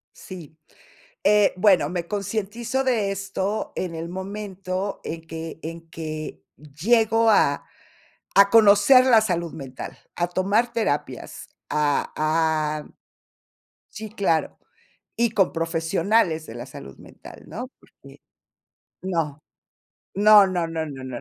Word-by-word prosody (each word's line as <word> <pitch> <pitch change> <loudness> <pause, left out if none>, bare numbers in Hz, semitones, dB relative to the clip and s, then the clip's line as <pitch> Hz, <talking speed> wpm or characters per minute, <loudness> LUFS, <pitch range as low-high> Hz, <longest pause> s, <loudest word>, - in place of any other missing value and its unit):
Sí, 165 -5 -11 0.7
eh, 205 0 +4
bueno, 190 -2 +4
me 175 -1 -3
concientizo 215 +6 -2
de 225 -6 +1
esto 195 +1 -3
en 180 -3 -3
el 165 +1 -5
momento 190 0 -5
en 165 0 -5
que 160 0 -7
en 165 +1 -8
que 155 - -6
llego 220 +10 +2
a 145 -8 +3 0.7
a 200 0 +7
conocer 225 +4 +6
la 230 -4 +6
salud 170 -6 -2
mental, 135 -4 -8 0.2
a 175 0 -1
tomar 200 +7 +1
terapias, 145 - -3 0.2
a 150 -1 0
a 155 -1 0 1.1
Sí, 220 +1 -7
claro. 190 -7 0 0.6
Y 235 -2 +1
con 195 -5 +2
profesionales 165 +1 0
de 115 - -9
la 120 - -7
salud 70 -1 -11
mental, - - -14
¿no? 250 +3 -6
Porque, - - -18 0.8
no. 165 -6 -2 0.7
No, 205 0 +7
no, 175 -3 -1
no, 160 -1 -3
no, 135 -3 -8
no, 130 -2 -6
185 Hz, 120 wpm, -23 LUFS, 160-210 Hz, 1.1 s, a